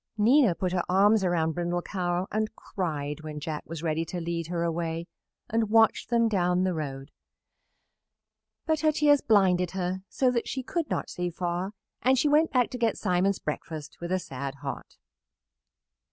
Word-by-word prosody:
Nina 230 - +5
put 185 0 -1
her 180 -1 +1
arms 200 +3 +4
around 170 -3 +1
Brindle 175 +1 -2
Cow 180 -1 -1
and 215 0 -1
cried 150 -5 -4
when 155 -1 -6
Jack 150 0 -4
was 165 0 -6
ready 160 0 0
to 175 +2 -5
lead 170 -1 -3
her 170 0 -2
away 165 0 -2 0.4
and 225 -1 0
watched 225 0 +4
them 235 -1 +3
down 180 -3 +2
the 185 -1 +1
road; 140 -3 -5 1.5
but 315 -1 +1
her 310 0 +3
tears 295 -1 +4
blinded 185 -4 +3
her 185 +1 -2
so 255 -2 +2
she 260 - -4
could 330 +4 -2
not - - -2
see 180 0 -2
far, 175 +3 -3 0.3
and 260 +2 +4
she 295 - +3
went 305 +2 +4
back 250 -2 +2
to 250 - -5
get 230 -2 +1
Simon's 185 +2 +1
breakfast 150 0 -6
with 170 +1 -4
a 185 - +3
sad 140 -5 -5
heart. 135 - -6
180 Hz, 170 wpm, -27 LUFS, 165-220 Hz, 1.5 s, Nina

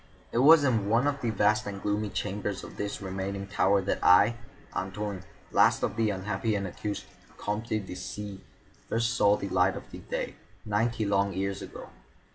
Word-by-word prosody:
It 115 - +1
was 150 +3 +8
in 115 -7 +1
one 115 +4 +3
of 145 -1 0
the 120 - 0
vast 105 0 +2
and 100 -1 -5
gloomy 105 +1 -1
chambers 100 -1 -3
of - - -10
this 100 0 -4
remaining 95 +1 -3
tower 100 0 +2
that 100 - -1
I, 100 +6 +6 0.4
Antoine, 95 0 -4 0.3
last - - +4
of 100 - 0
the 110 -1 +2
unhappy 105 +2 -1
and 100 -1 -1
accursed 100 +3 -4 0.3
Comtes 105 +3 -3 0.2
de - - -7
C——, 95 +2 -6 0.5
first 115 +1 +1
saw 105 -4 +4
the 100 - -4
light 95 +1 +3
of - - -7 0.3
day, - - -2 0.3
ninety 110 +1 0
long 100 -1 +1
years 95 +1 -2
ago. - - -9
100 Hz, 175 wpm, -28 LUFS, 95-110 Hz, 0.5 s, was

